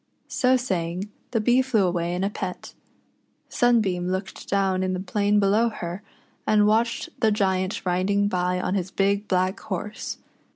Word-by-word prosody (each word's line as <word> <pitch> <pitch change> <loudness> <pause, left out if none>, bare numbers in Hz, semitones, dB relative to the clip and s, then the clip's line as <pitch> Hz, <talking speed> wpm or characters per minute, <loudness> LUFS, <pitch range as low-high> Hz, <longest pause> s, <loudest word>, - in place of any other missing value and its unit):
So 255 0 +3
saying, 185 -4 -3 0.2
the 230 - 0
Bee 245 +4 +4
flew 240 -7 +2
away 175 -1 -1
in 180 - -2
a 195 - +1
pet. 185 -3 -6 0.8
Sunbeam 210 -8 +2
looked 190 +1 -4
down 190 -1 +1
in 185 0 0
the 185 - -2
plain 205 +2 +1
below 210 +4 +3
her, 180 -2 -6 0.5
and 210 -1 +4
watched 230 +2 +1
the 220 - +3
Giant 190 -2 0
riding 190 +3 +1
by 180 -1 0
on 185 - -1
his 190 -2 -1
big 200 +2 0
black 185 0 +1
horse. 210 +3 -5
195 Hz, 160 wpm, -25 LUFS, 185-215 Hz, 0.8 s, Bee